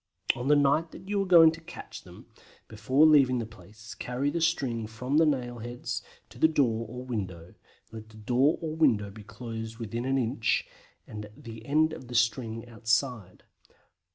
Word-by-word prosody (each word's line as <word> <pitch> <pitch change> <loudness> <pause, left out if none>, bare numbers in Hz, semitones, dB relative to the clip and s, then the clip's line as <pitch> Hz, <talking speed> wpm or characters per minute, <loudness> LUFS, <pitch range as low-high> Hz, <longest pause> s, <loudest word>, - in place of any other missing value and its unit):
On 125 +2 -4
the 150 - +6
night 145 +3 +3
that 190 - -12
you 200 0 0
are 195 - -2
going 165 -3 +8
to 165 +1 -10
catch 175 +2 -10
them, - - -14 0.4
before 130 +8 +2
leaving 140 -5 +5
the 115 - -2
place 110 0 -13
carry 130 +4 -2
the 170 - -2
string 130 -9 0
from 125 +6 -2
the 160 0 +5
nail 120 -4 -1
heads 120 +2 -5 0.3
to - - -15
the - - +6
door 120 -8 +1
or 125 +2 -7
window; 95 -8 -5 0.4
let 110 -1 -10
the 110 - -15
door 125 +7 +2
or 155 -1 -3
window 115 -11 +2
be 110 +2 -11
closed 115 +1 -7
within 115 +1 -4
an 135 +1 +1
inch, 115 -2 0 0.4
with 105 0 -7 0.2
the 115 -1 -9
end 155 +2 +3
of 130 - -9
the 120 - -7
string 115 0 0
outside. 115 -2 -2
120 Hz, 180 wpm, -28 LUFS, 110-145 Hz, 0.4 s, going